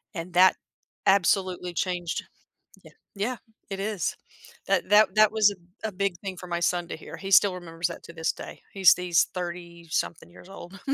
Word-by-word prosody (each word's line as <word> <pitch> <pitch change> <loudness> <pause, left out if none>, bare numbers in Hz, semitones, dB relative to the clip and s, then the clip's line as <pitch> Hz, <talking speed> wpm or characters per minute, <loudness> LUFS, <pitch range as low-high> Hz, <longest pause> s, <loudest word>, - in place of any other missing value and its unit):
And 170 +1 -6
that 185 +1 +6 0.5
absolutely 185 -2 +2
changed 175 -1 -2 0.6
yeah - - -15 0.2
yeah, 230 +5 -2 0.3
it 195 0 -5
is. 200 -4 -2 0.5
That - - +1
that 210 -1 +5
that 215 0 +6
was 215 -2 +4 0.3
a - - 0
a - - -11
big 195 0 -1
thing 190 -2 -5
for 180 - -9
my 170 0 -2
son 175 0 0
to - - -4
hear, - - -10
he 195 0 -7
still 195 -1 +6
remembers 170 -1 -3
that 170 - -9
to 170 - -11
this 160 0 -1
day. - - -10
He's 190 -2 +7
he's 180 -2 +2
30-something 170 -2 -4
years 175 - -15
old. 195 0 -11
180 Hz, 180 wpm, -26 LUFS, 175-195 Hz, 0.6 s, He's